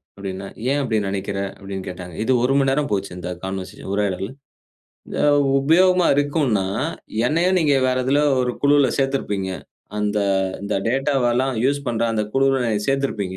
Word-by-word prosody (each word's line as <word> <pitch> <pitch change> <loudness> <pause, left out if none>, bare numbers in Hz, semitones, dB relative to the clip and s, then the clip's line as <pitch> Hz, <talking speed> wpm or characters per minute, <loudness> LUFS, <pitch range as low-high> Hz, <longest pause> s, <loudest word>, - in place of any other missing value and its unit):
அப்படின்னேன். 95 0 -6 0.2
ஏன் 145 - +1
அப்படி 115 -5 0
நெனைக்கிற? 100 0 -3 0.2
அப்படின்னு 95 -1 -6
கேட்டாங்க. 90 -1 -8
இது 130 - 0
1 135 +2 +2
மணி 135 -1 +2
நேரம் 145 +1 0
போச்சு, 100 -2 -1
இந்த 90 0 -5
கான்வர்சேஷன் 95 0 -6
உரையாடல். 100 -1 -1 0.9
அ - - +3 0.4
உபயோகமா 180 +4 +4
இருக்குன்னா, 145 -9 +1 0.6
என்னையும் 180 +6 +2
நீங்க 145 -3 +3
வேற 130 0 +1
எதில 140 +3 +2 0.2
ஒரு 125 -1 0
குழுவுல 145 -1 +5
சேத்திருப்பீங்க. 105 -9 -1 0.5
அந்த 105 0 0 0.4
இந்த 100 +1 -2
டேட்டாவ 135 -1 +1
எல்லாம் 130 +1 +1
யூசு 140 +1 +2
பண்ற 115 -1 -1
அந்த 110 -1 0
குழுவில 135 -2 +2 0.2
சேர்த்திருப்பீங்க. 110 -9 -1
125 Hz, 150 wpm, -21 LUFS, 100-140 Hz, 0.9 s, குழுவுல